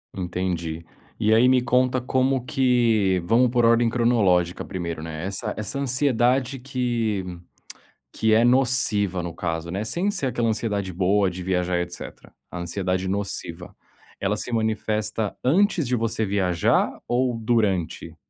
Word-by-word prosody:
Entendi. 85 -3 -3 0.3
E 110 0 +3
aí 115 +3 +5
me 130 -1 +4
conta 125 +1 +2
como 130 0 0
que 120 -9 +2
vamos 120 +6 +3
por 120 -1 +2
ordem 115 0 +4
cronológica 100 -8 +2
1º, 85 -3 -5
né, 80 +1 -6
essa 95 0 -3
essa 110 +6 -3
ansiedade 130 -1 +1
que 120 -6 -1 0.9
que 110 0 +2
é 115 +2 +5
nociva 120 -7 +2
no 85 - -5
caso 85 -1 -4
né, 100 +3 -2
sem 175 - -1
ser 190 -9 -3
aquela 120 -2 0
ansiedade 105 -4 -2
boa 95 +2 +2
de 90 0 -7
viajar 90 -1 0
etcétera, 90 0 -8 0.2
a 90 - -7
ansiedade 90 +1 -2
nociva. 95 -3 -4 0.5
Ela 100 +2 0
se 125 - -6
manifesta 110 -1 -1
antes 170 - +2
de 125 - +1
você 115 -1 -1
viajar 95 -4 +1 0.2
ou 125 +1 +1
durante? 105 -7 -1
110 Hz, 140 wpm, -24 LUFS, 90-125 Hz, 0.9 s, aí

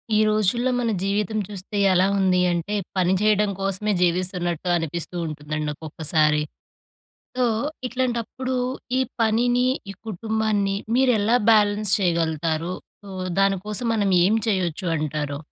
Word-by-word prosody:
ఈ - - +4
రోజుల్లో 215 +4 +1
మన 235 -2 0
జీవితం 205 +2 -1
చూస్తే 205 0 -6 0.2
ఎలా 185 +1 +4
ఉంది 185 -2 +3
అంటే 175 +4 -2 0.2
పని 185 0 +3
చేయడం 210 -1 +3
కోసమే 195 +2 -1
జీవిస్తున్నట్టు 180 -1 0
అనిపిస్తూ 170 +1 -4
ఉంటుందండి 150 0 -4
ఒక్కొక్కసారి. 155 0 +1 1.0
సో 255 - +2 0.4
ఇట్లాంటప్పుడు, 255 +1 -2 0.4
ఈ - - +2 0.2
పనిని, 245 +3 +2 0.2
ఈ 195 - -7
కుటుంబాన్ని 215 -1 -1 0.2
మీరు 260 -1 +4
ఎలా 225 +4 +3
బ్యాలెన్స్ 210 -1 +3
చేయగలుగుతారు? 165 -2 0 0.3
సో 200 - -12 0.3
దాని 195 0 +3
కోసం 215 +3 -1
మనం 200 -3 +1 0.2
ఏం 215 +3 +3
చేయొచ్చు 185 -4 -1
అంటరు? 150 -2 -3
195 Hz, 125 wpm, -23 LUFS, 170-215 Hz, 1.0 s, ఈ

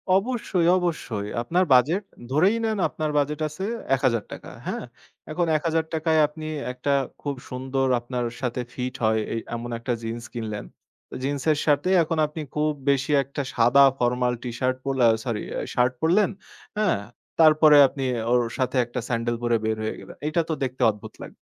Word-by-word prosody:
অবশ্যই, 195 -5 0
অবশ্যই। 145 - -2
আপনার 175 +9 +1
বাজেট, 155 - +4 0.3
ধরেই 185 +10 +3
নেন 220 -1 0
আপনার 155 -1 -3
বাজেট 145 +1 0
আছে 155 +6 -5 0.3
১০০০ 125 -5 +1
টাকা। - - -8 0.2
হ্যাঁ? - - -3 0.5
এখন 175 +2 0
১০০০ 160 +1 0
টাকায় 160 0 +2
আপনি 155 +1 -8 0.2
একটা 125 +3 -1 0.3
খুব 145 -1 -3
সুন্দর 130 +1 -1
আপনার 120 0 -3 0.2
সাথে 125 -1 -2
ফিট 125 0 -3
হয় 110 0 +3
এই 115 - -1 0.2
এমন 120 +1 -5
একটা 120 +1 -2
জিন্স 115 +1 -4
কিনলেন। 110 -3 -4 0.6
জিন্সের 145 +2 0
সাথে 145 +3 +2
এখন 160 0 -2
আপনি 150 +1 -7
খুব 150 0 +2 0.2
বেশি 140 +1 +1
একটা 140 +2 -5
সাদা 120 +4 +5 0.2
ফরমাল 125 0 +1
T-Shirt 130 +1 -1
পোলা, 135 -3 +3 0.2
সরি 115 -4 -2
অ্যা - - -2
শার্ট 125 +1 +2
পরলেন। 185 +5 +3 0.5
হ্যাঁ? 210 - +2 0.4
তারপরে 155 -1 +7
আপনি 135 +1 -5 0.3
ওর 125 - +4 0.2
সাথে 130 0 0
একটা 120 +2 -5
স্যান্ডেল 120 -1 -1
পরে 120 -1 +2
বের 110 0 0
হয়ে 110 - -2
গেলেন। - - -12
এইটা 155 +2 +1
তো - - +1
দেখতে 130 0 -4
অদ্ভুত 105 -1 -11
লাগ - - -8
135 Hz, 165 wpm, -24 LUFS, 120-155 Hz, 0.6 s, তারপরে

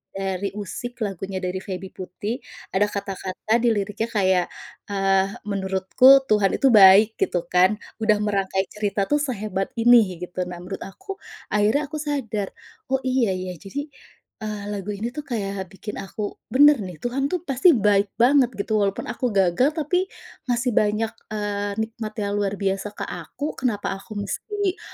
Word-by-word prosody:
dari 195 0 -2
Usik, 235 +3 -5
lagunya 195 -1 -4
dari 180 +1 -2
Feby 190 -1 -6
Putri. 205 +7 -5 0.3
Ada 205 +2 +2
kata-kata 200 +2 -2
di 240 - +1
liriknya 210 +2 -2
kayak, 190 -5 +2 0.4
eee, 195 -1 +2 0.2
"Menurutku 200 +7 +4
Tuhan 210 -6 +2
itu 270 -3 +4
baik," 205 +1 +7
gitu 175 -2 0
kan. 185 +3 +5 0.2
Udah 215 -1 +3
merangkai 195 -2 0
cerita 205 -1 -1
tuh 295 - +4
sehebat 215 -8 -3
ini 230 -5 +5
gitu. 180 0 -4
Nah 180 - -6
menurut 190 +2 -6
aku, 385 - -9 0.3
akhirnya 210 +8 +3
aku 305 - -3
sadar, 245 -9 -2 0.4
“Oh 265 0 0
iya 255 -7 +1
ya,” 185 -3 -5
jadi, 285 +9 -6 0.5
eee, 210 -2 -5
lagu 205 0 -4
ini 225 +4 -3
tuh 295 +3 -6
kayak 200 -5 -3
bikin 205 +3 -8
aku 205 +1 -5
bener 290 0 +7
nih, 180 -4 -6
Tuhan 270 +3 0
tuh 355 -2 -2
pasti 275 +4 +4
baik 205 -2 +2
banget 250 +1 +5
gitu. 210 +1 0
Walaupun 200 -1 -1
aku - - -3
gagal, 195 - +3
tapi 360 +4 0 0.4
masih 245 0 +1
banyak, 215 +1 0 0.2
eee, 205 -1 -2
nikmat 220 -1 -5
yang 200 - -2
luar 200 0 0
biasa 195 0 -1
ke - - -5
aku. 295 +2 -5
Kenapa 225 -7 -1
aku 215 +1 -11
mesti 405 - -2
210 Hz, 160 wpm, -23 LUFS, 195-245 Hz, 0.5 s, baik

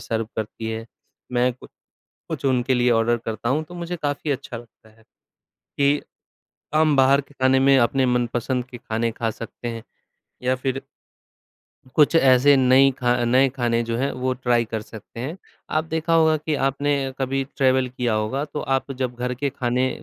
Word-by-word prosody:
सर्व 115 -1 -2
करती 110 +1 -4
है, 110 0 -4 0.5
मैं 125 +1 +2 0.8
कुछ - - -4
उनके 130 0 +2
लिए 125 0 +2
ऑर्डर 115 +1 +2
करता 115 +1 -3
हूँ, 150 +4 +1
तो 175 +3 -13
मुझे 175 0 -4
काफ़ी 145 +1 -1
अच्छा 130 -3 -4
लगता 115 -1 -16
है 110 +1 -24 0.7
कि 145 +1 +3 0.7
हम 155 -2 +4
बाहर 135 +1 +5
के 145 +1 -19
खाने 130 0 +4
में 135 0 +5
अपने 130 +2 +2
मनपसंद 125 +1 0
के 120 - -8
खाने 115 0 -2
खा 115 0 -2
सकते 115 +2 -7
हैं। 115 -1 -5 0.6
या 130 +1 +2
फ़िर 130 +1 -3 1.2
कुछ 150 +1 +5
ऐसे 135 -1 +6
नई 130 +1 +5
खा 120 -1 +2
नए 130 +3 +4
खाने 120 -2 +1
जो 115 0 -2
हैं, 135 +3 0
वो 130 0 -1
ट्राय 120 -2 +1
कर 110 0 -4
सकते 110 +2 -11
हैं। 150 +8 -4 0.3
आप 155 +1 +1
देखा 160 +1 -2
होगा 160 -1 +4
कि 155 0 -3
आपने 140 +2 0 0.3
कभी 135 0 -1
ट्रैवल 130 -1 +3
किया 125 -2 -2
होगा, 110 +7 -1
तो 150 0 -6
आप 135 +1 -1
जब 125 -2 -3
घर 125 +1 -2
के 140 +3 -2
खाने 125 -1 0
130 Hz, 175 wpm, -23 LUFS, 120-140 Hz, 1.2 s, ऐसे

